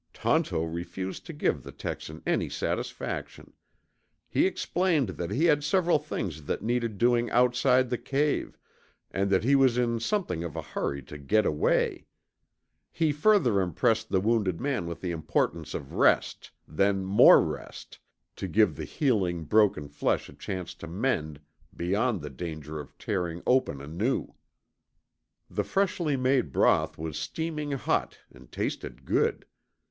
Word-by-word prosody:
Tonto 80 - +1
refused 85 +3 -5
to - - -5
give - - 0
the - - -10
Texan 80 0 -6
any - - 0
satisfaction. - - -4 0.7
He - - +2
explained 170 - 0
that 85 -1 -4
he 155 +6 +1
had 145 -3 +3
several 175 -2 +3
things 90 - -5
that - - -3
needed 115 -2 -1
doing 120 +1 +2
outside 125 +1 +3
the 125 - 0
cave, 145 +2 -1 0.5
and 100 +1 0
that 95 0 +2
he 135 +4 +3
was 135 -3 +4
in 120 -1 +1
something 115 - -1
of 85 -2 -6
a 80 - -3
hurry 70 -2 -3
to 75 +4 -10
get 105 +10 +2
away. 75 - +1 0.8
He 160 -2 +1
further 145 - +3
impressed 110 +6 +1
the 95 - +2
wounded 100 -4 +1
man 130 -10 -1
with 85 -1 -6
the 90 - -2
importance 80 -1 -1
of 70 - -6
rest, - - +2 0.2
then 95 +4 +1
more 95 +2 +8
rest, - - -5 0.4
to 95 - -4
give 95 -3 +3
the - - -5
healing 95 - 0
broken 100 -4 +3
flesh 70 - -1
a - - -12
chance 90 -3 -5
to 85 - -10
mend 85 - -1 0.4
beyond 100 +4 0
the 75 - -6
danger 80 +1 -6
of 75 - -11
tearing 90 -3 -3
open 125 - +2
anew. 85 - -2 1.1
The - - -2
freshly 185 -7 0
made 130 - +1
broth 80 +3 +2
was 80 -1 -4
steaming 150 - -3
hot 135 - -1
and 60 -1 -17
tasted 65 +1 -4
good. - - +1
100 Hz, 150 wpm, -28 LUFS, 80-130 Hz, 1.1 s, more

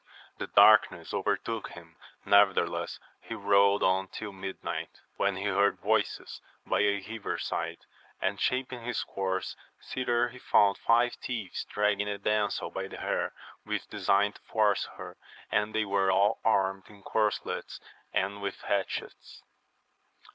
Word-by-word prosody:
The - - -3
darkness - - +5
overtook 115 -2 -1
him, 85 -1 -13 0.3
nevertheless 100 -2 +3 0.2
he 115 - -7
rode 100 -1 +4
on 95 +1 +2
till 105 +2 -7
midnight, 95 0 -6 0.2
when 100 -1 +1
he 95 - -4
heard 100 0 +2
voices - - -1 0.2
by - - +1
a 100 -1 +1
river 110 -6 -4
side, 85 0 -3 0.4
and 95 +1 -1
shaping 125 -1 -1
his 120 -1 -2
course 95 -1 -3 0.2
thither 120 -1 0
he 125 +1 -12
found 100 -4 +3
five 120 +1 +3
thieves 115 -8 -4
dragging 105 0 0
a 100 - -2
damsel 105 +1 0
by - - -4
the - - -9
hair, - - -2 0.3
with - - -4
design 100 +1 +2
to - - -17
force 105 -3 +1
her, - - -9 0.3
and 105 +1 0
they 110 0 +2
were 100 -1 +2
aU 100 +2 +3
armed 95 -3 +1
in 100 -2 -16
corslets 105 -1 -1 0.3
and 100 +1 -1
with 100 -1 -4
hatchets. 100 -1 -3
100 Hz, 140 wpm, -29 LUFS, 95-110 Hz, 0.4 s, darkness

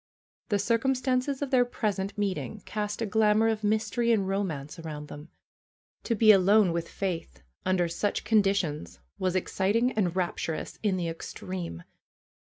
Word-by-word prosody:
The 205 - +2
circumstances 255 +5 0
of 280 - -4
their 255 -2 +5
present 205 -5 -2
meeting 195 -1 -3
cast 210 +1 -3
a - - 0
glamor 215 +1 +3
of 220 -1 -2
mystery 220 +3 +1
and 200 -4 +2
romance 165 -7 -3
around 150 -2 -7
them. 150 +3 -10 0.8
To 230 - +1
be 215 0 +7
alone 200 0 +5
with 170 0 -3
Faith 165 - -4 0.2
under 185 -2 +2
such 185 +5 -1
conditions 200 - +1 0.2
was 185 -1 0
ex 185 - -2
citing 225 +6 +2
and 185 -7 0
rapturous 170 -3 -3
in 200 -3 +1
the 175 -2 -2
extreme. 165 - -6
200 Hz, 150 wpm, -28 LUFS, 175-220 Hz, 0.8 s, be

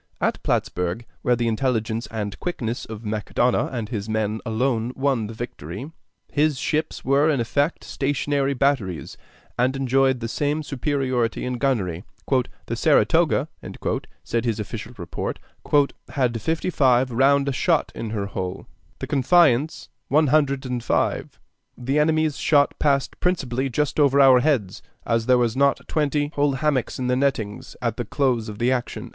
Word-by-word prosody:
At - - 0
Plattsburg, 90 +6 -1 0.2
where 125 - +2
the 120 0 -1
intelligence 115 -1 -1
and 105 -3 -4
quickness 120 -10 -3
of 110 0 -8
Macdonough 110 +3 0
and 115 -5 -4
his 110 -3 -4
men 110 0 -1
alone 115 +1 0
won 135 -5 0
the 115 - -7
victory, 110 - -7 0.4
his 150 -1 +2
ships 155 +3 -2
were 140 +3 +3
in 145 -4 +1
effect 140 +7 0
stationary 140 0 -1
batteries, 120 - 0 0.4
and 130 +2 +2
enjoyed 135 -1 +2
the 115 - -3
same 145 +5 -1
superiority 130 -4 -1
in 125 -1 -3
gunnery. 100 -11 0 0.6
"The - - -3
Saratoga," - - +3 0.8
said 115 -1 -1
his 115 -3 -1
official 110 +3 -6
report, 85 -2 -4 0.7
"had 120 -5 0
fifty 160 +7 -1
five 130 -4 +3
round 140 +3 +3
shot 165 +4 +1
in 115 - -5
her 105 -2 -2
hull; 95 -1 -5 0.3
the - - -5
Confiance, 145 0 +3 0.2
one 155 +2 +3
hundred 140 -3 +2
and 125 -2 -3
five. - - -1 0.4
The 135 +4 0
enemy's 155 -1 +2
shot 145 -2 +3
passed 140 -3 +1
principally 135 -7 0
just 150 +4 -1
over 140 -1 +4
our 135 -2 +7
heads, 125 -9 0 0.2
as 115 0 0
there 125 -1 +5
were 120 -1 +3
not 140 +1 +2
twenty 145 -1 0
whole 145 -1 +2
hammocks 135 -3 0
in 130 - -3
the 125 0 +2
nettings 130 -3 -2
at 115 -2 -1
the 120 - -3
close 120 -3 0
of 105 - -7
the 120 +3 +1
action." 125 -2 -3
130 Hz, 155 wpm, -23 LUFS, 115-140 Hz, 0.8 s, our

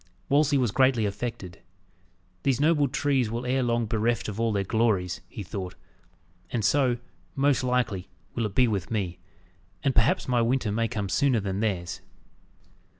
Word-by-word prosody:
Wolsey 145 0 +4
was 125 -5 +1
greatly 130 -2 +3
affected. 100 -3 -5 0.8
"These 135 -2 +1
noble 150 -1 +3
trees 135 -3 +1
will 120 +2 -3
ere 130 +2 +1
long 120 -1 +1
bereft 110 +1 0
of 105 0 -5
all 115 -1 +2
their 100 -2 0
glories," 100 -4 0
he 105 - -7
thought, 95 -1 -6 0.7
"and 110 0 -1
so, 130 -1 +3 0.4
most 140 -2 +2
likely, 120 -7 0 0.2
will 115 -2 0
it 100 - -11
be 125 -1 +5
with 100 -6 -2
me, 95 -6 -2 0.6
and 135 -2 +2
perhaps 115 -2 +2
my 125 -2 +2
winter 120 -2 +1
may 115 +2 +1
come 105 -4 -3
sooner 130 +4 +2
than 95 -1 -3
theirs!" 95 -6 -2
115 Hz, 160 wpm, -27 LUFS, 100-130 Hz, 0.8 s, be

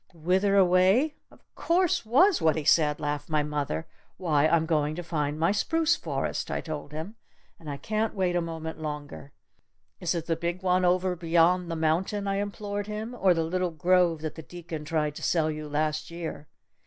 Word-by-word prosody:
"'Whither 185 +5 +1
away?' 190 - +4 0.2
of - - -21
course 345 -8 +1
was 345 - +4
what 160 -1 +3
he 155 - -2
said!" 150 0 +3
laughed 145 0 -3
my 155 -1 +1
mother. 145 - -3 0.3
"'Why, 155 -4 +2
I'm 160 0 +2
going 155 -2 0
to 175 - -5
find 150 -3 -2
my 165 +3 +3
spruce 325 +10 +2
forest!' - - -3
I - - -1
told 150 -3 -6
him. 160 +9 -7 0.4
'And 155 - -9
I 140 - -4
can't 215 +6 -2
wait 185 -2 0
a 175 - +2
moment 160 -1 -6
longer! 150 -2 -6 0.7
Is 175 0 -1
it 165 -1 -3
the 165 - 0
big 170 +3 -3
one 185 0 +2
over 180 +1 +2
beyond 170 +1 +2
the 165 - -2
mountain?' 175 +6 0
I 195 0 0
implored 205 0 -4
him. 215 +3 -5
'Or 190 -7 +3
the 165 - +1
little 180 +2 -1
grove 170 0 +2
that 155 -1 -4
the 160 - -9
deacon 165 -2 -8
tried 150 -1 -1
to - - -8
sell 160 -2 +1
you 155 0 -6
last 155 +1 -1
year?'" 170 -3 -6
170 Hz, 190 wpm, -27 LUFS, 155-190 Hz, 0.7 s, away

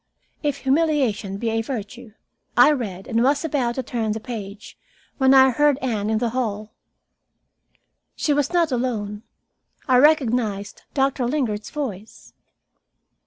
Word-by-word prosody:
"If 290 -3 -1
humiliation 265 -9 +1
be 225 +2 -2
a 225 0 0
virtue 225 -1 -7 0.2
" - - -43
I - - +5
read 205 -10 -4
and 230 -1 +1
was 280 +5 +2
about 260 -7 -1
to 260 - -3
turn 225 -4 -2
the 220 - -4
page, 215 -3 -8 0.4
when 265 0 +4
I 265 -1 +7
heard 295 +2 +3
Anne 220 -6 -2
in 220 - +1
the 235 0 -1
hall. 215 -4 -3 1.4
She 295 - 0
was 285 -1 0
not 340 -4 +2
alone. 220 -5 -2 0.7
I 255 -2 +5
recognized 245 -8 +2
Doctor 270 -2 +1
Lingard's 235 -7 -2
voice. 220 -8 -7
245 Hz, 140 wpm, -22 LUFS, 215-275 Hz, 1.4 s, I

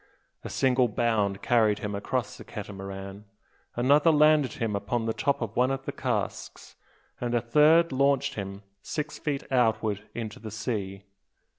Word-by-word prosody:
A - - -6
single 130 -1 +2
bound 105 -3 0
carried 110 -4 +3
him 105 -2 -4
across 100 0 -2
the - - -11
Catamaran, 95 0 -8 0.5
another 145 +6 +4
landed 150 -4 +4
him 110 -3 -2
upon 110 +3 -2
the 110 - 0
top 140 -2 0
of 110 -1 -6
one 125 +1 +3
of 135 0 -3
the - - -3
casks, - - -4 0.4
and 120 0 -1
a - - +4
third 150 +7 +4
launched 140 +1 +2
him 100 -2 -6 0.2
six 150 - -4
feet 145 -3 -2
outward 110 -4 +1
into 110 -3 -5
the 110 - -7
sea. 100 -3 -4
115 Hz, 155 wpm, -27 LUFS, 105-135 Hz, 0.5 s, another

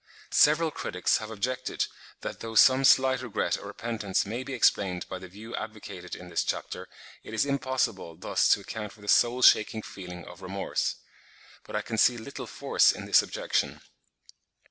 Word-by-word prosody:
Several 155 +2 +4
critics 90 -10 0
have 110 - -7
objected 120 +4 -2 0.4
that - - -6
though 115 0 -7
some 130 +3 +6
slight 130 -1 +5
regret 120 -5 -1
or - - -9
repentance 110 -5 -2
may 115 +5 -4
be 135 - -6
explained 95 -6 +2
by 95 - -6
the 95 - -10
view 105 +6 -9
advocated 110 -1 -7
in 90 - -11
this 85 - -1
chapter, - - -4 0.3
it 110 - -8
is 110 - +2
impossible 130 - -1
thus 85 - +1
to - - -10
account 105 -2 -6
for 105 - -18
the 105 - -12
soul 120 +4 +3
shaking 110 0 +5
feeling 90 -2 -9
of 90 +1 -12
remorse. 95 +1 -2 0.7
But - - -8
I - - -1
can 110 -1 -3
see 125 - +5
little 115 +5 -7
force - - +3
in - - -7
this - - +6
objection. - - -2
110 Hz, 175 wpm, -28 LUFS, 95-125 Hz, 0.7 s, some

